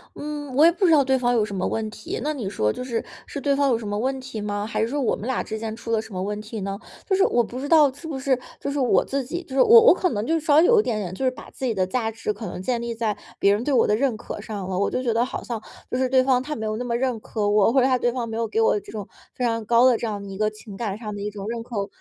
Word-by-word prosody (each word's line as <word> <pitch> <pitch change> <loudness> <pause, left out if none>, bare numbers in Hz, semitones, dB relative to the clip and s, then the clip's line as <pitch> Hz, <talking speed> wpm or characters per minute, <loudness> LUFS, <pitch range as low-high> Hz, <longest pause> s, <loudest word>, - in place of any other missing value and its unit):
嗯， 290 -2 -6
我 305 +3 +6
也 340 - +7
不 385 +3 -4
知 - - +4
道 295 -3 +6
对 265 0 +2
方 245 -1 +2
有 215 -2 +3
什 200 - -6
么 185 - -1
问 220 -1 -2
题， 360 - -6
那 305 +1 0
你 225 -9 -4
说 105 - 0
就 250 - -5
是， 235 -3 -3 0.2
是 285 - -5
对 280 +1 +1
方 280 0 +2
有 235 - +3
什 220 -3 -7
么 205 - -2
问 265 +2 -1
题 255 -4 -6
吗？ 205 0 -2
还 215 -1 -2
是 225 - +2
说 285 +4 -2
我 255 - +1
们 220 - -7
俩 260 - 0
之 220 0 -5
间 220 -1 -4
出 230 0 -7
了 220 -1 +2
什 220 -1 -13
么 185 0 -3
问 210 +1 -3
题 215 0 -7
呢？ 195 +1 -4 0.3
就 385 - +2
是 385 - +2
我 240 - +2
不 245 +3 -7
知 285 - -4
道， 300 -5 +6
是 320 +4 -10
不 280 -4 -4
是 265 -2 +1 0.2
就 280 - -3
是 285 - -2
我 250 - +3
自 275 -1 -2
己， 345 +7 -5
就 - - -26
是 270 - +5
我 465 +1 +9
我 - - +9
可 370 -1 0
能 210 -3 -2
就 320 - 0
是 320 -2 0
稍 290 -2 +3
微 330 - +7
有 465 -2 +6
一 - - +3
点 230 -3 -1
点， 185 -3 -4
就 265 - -5
是 260 - +4
把 255 - -11
自 - - -11
己 - - +1
的 185 -1 +1
价 225 +3 -1
值 220 -1 -3
可 220 - -7
能 - - -6
建 240 0 -1
立 235 -1 -4
在 220 -2 -1 0.2
别 200 - +4
人 210 +4 -1
对 290 - -1
我 250 - +4
的 210 - +2
认 245 -2 0
可 - - -7
上 205 -4 -6
了， 185 0 -2
我 200 - +1
就 255 - -2
觉 235 -3 +1
得 230 +2 +2
好 255 - -5
像， 230 -3 -4 0.3
就 - - -1
是 260 0 +1
对 260 -1 +4
方 255 -1 +3
他 300 +3 -4
没 220 - -4
有 215 - -1
那 250 - -3
么 235 -1 -1
认 250 -2 -1
可 215 -1 -2
我， 205 +1 +4
或 265 - +4
者 255 - +4
他 255 -2 +2
对 240 - +1
方 240 -2 -3
没 225 - -5
有 230 0 -1
给 220 +1 -1
我 220 -2 +3
这 - - -13
种， 210 -2 -6 0.3
非 250 - -1
常 230 -1 0
高 235 +3 +5
的 250 -2 +6
这 230 - -2
样 200 -2 -5
一 195 - -7
个 215 +1 +1
情 215 -1 -12
感 205 -2 -3
上 215 -2 -6
的 200 - -6
一 210 - -2
种 200 -1 -8
认 230 0 -3
可， 210 -4 -4
235 Hz, 375 characters per minute, -24 LUFS, 215-265 Hz, 0.3 s, 我